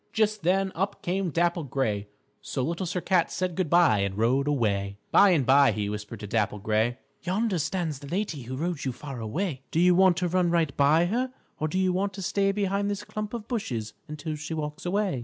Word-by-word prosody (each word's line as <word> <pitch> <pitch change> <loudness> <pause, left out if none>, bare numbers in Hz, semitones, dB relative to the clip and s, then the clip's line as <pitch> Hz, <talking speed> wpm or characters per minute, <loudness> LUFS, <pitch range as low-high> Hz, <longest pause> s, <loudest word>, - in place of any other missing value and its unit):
Just 215 -1 +1
then 190 +3 +2
up 195 +3 -3
came 185 +1 0
Dapple 170 +1 +1
Gray, 110 -6 -1 0.3
so 130 - -3
Little 170 +5 -2
Sir 180 +1 -2
Cat 180 -2 +2
said 185 -1 -2
good 175 -2 -1
by 170 - +5
and 100 0 -1
rode 130 +6 +2
away. 100 -8 0
By 200 - +7
and 160 -8 +3
by, 140 +2 +5
he 105 -1 -2
whispered 105 +1 -6
to - - -5
Dapple 105 0 0
Gray, 110 +4 0 0.2
"Yonder 195 0 0
stands 160 -2 -2
the 140 - -10
lady 175 -3 -2
who 130 +2 -6
rode 170 0 -2
you 130 - -2
far 135 0 -7
away. 135 - -2
Do 160 - 0
you 180 +1 +6
want 185 -1 +5
to 180 -1 0
run 180 0 +2
right 165 -5 +1
by 150 +4 +4
her, 245 +7 -1 0.3
or 155 - 0
do 180 - -2
you 185 -1 +2
want 195 +2 -1
to 195 0 -6
stay 195 +2 +1
behind 200 0 0
this 205 -1 -3
clump 210 -1 -5
of 225 -2 -7
bushes 120 - -3
until 150 +1 -5
she 150 +2 -5
walks 150 +2 -4
away?" 195 -6 0
165 Hz, 220 wpm, -27 LUFS, 130-190 Hz, 0.3 s, By